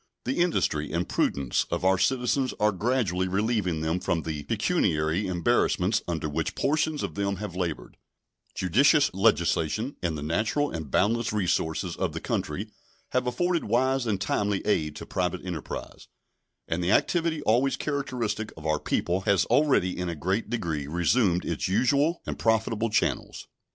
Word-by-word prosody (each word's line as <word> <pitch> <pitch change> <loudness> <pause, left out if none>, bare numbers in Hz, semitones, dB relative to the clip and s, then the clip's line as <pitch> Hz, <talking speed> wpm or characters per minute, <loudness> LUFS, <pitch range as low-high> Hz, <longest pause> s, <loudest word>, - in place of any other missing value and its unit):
The 130 +6 -1
industry 75 - +1
and 85 +2 -1
prudence 70 -3 0
of - - -2
our 95 0 +4
citizens 125 +5 +1
are 105 0 +3
gradually 100 -3 0
relieving 100 -4 0
them 80 +3 0
from 85 -2 -1
the 80 -2 -4
pecuniary 80 +6 +1
embarrassments 95 +1 +1
under 80 -3 -2
which 75 - -2
portions 150 +1 0
of - - -3
them 100 0 -1
have 100 -2 -6
labored; 85 -4 -4 0.6
judicious 140 - +3
legislation 95 - +1
and 85 -3 -1
the 75 - -5
natural 105 - 0
and 80 -3 -5
boundless 115 - +1
resources 90 -4 -1
of - - -2
the - - -4
country - - -3 0.4
have 125 0 0
afforded 175 +6 0
wise 130 +3 +1
end 100 -3 -1
timely 100 0 0
aid 75 -8 0
to - - -7
private 90 0 -2
enterprise, 85 -4 -6 0.6
and 85 +2 -1
the 85 - 0
activity 165 -3 +1
always 125 +5 +2
characteristic 125 -7 -2
of 80 - -10
our 80 -1 +1
people 90 +2 -1
has 100 -1 +2
already 140 -11 +2
in 90 -1 -3
a 85 - -3
great 95 +8 -1
degree 80 -11 -2
resumed 90 - +2
its - - -2
usual 140 - +2
and - - -5
profitable 110 0 +1
channels. 105 - -1
100 Hz, 155 wpm, -27 LUFS, 85-125 Hz, 0.6 s, our